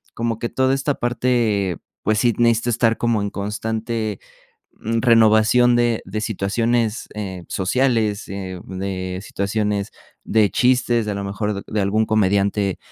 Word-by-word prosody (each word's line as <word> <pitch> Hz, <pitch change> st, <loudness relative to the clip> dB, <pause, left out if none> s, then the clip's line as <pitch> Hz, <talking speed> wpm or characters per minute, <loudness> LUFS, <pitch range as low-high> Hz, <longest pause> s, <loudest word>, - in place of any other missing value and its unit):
como 115 Hz, -1 st, -2 dB
que 120 Hz, -, -3 dB
toda 130 Hz, 0 st, +1 dB
esta 135 Hz, +1 st, -1 dB
parte, 115 Hz, -6 st, 0 dB, 0.3 s
pues, 110 Hz, +1 st, +1 dB
sí 120 Hz, +1 st, +3 dB
necesito 115 Hz, 0 st, +2 dB
estar 115 Hz, 0 st, +2 dB
como 115 Hz, -3 st, +1 dB
en 100 Hz, -, -3 dB
constante, 110 Hz, +1 st, -3 dB, 0.6 s
mm, 115 Hz, +1 st, -1 dB
renovación 115 Hz, +1 st, +5 dB
de 120 Hz, -2 st, +1 dB
de 105 Hz, +3 st, -4 dB
situaciones, 115 Hz, +2 st, -1 dB
eh, 95 Hz, -4 st, -6 dB
sociales, 110 Hz, 0 st, 0 dB
eh, 95 Hz, -2 st, -6 dB
de 95 Hz, -1 st, -4 dB
situaciones 100 Hz, 0 st, -2 dB, 0.3 s
de 110 Hz, -2 st, +2 dB
chistes, 120 Hz, -3 st, +2 dB
a 105 Hz, -, -1 dB
lo 100 Hz, -, -4 dB
mejor 100 Hz, 0 st, -3 dB
de 105 Hz, -1 st, -2 dB
algún 105 Hz, +3 st, +1 dB
comediante, 100 Hz, -1 st, +1 dB
110 Hz, 140 wpm, -21 LUFS, 100-120 Hz, 0.6 s, renovación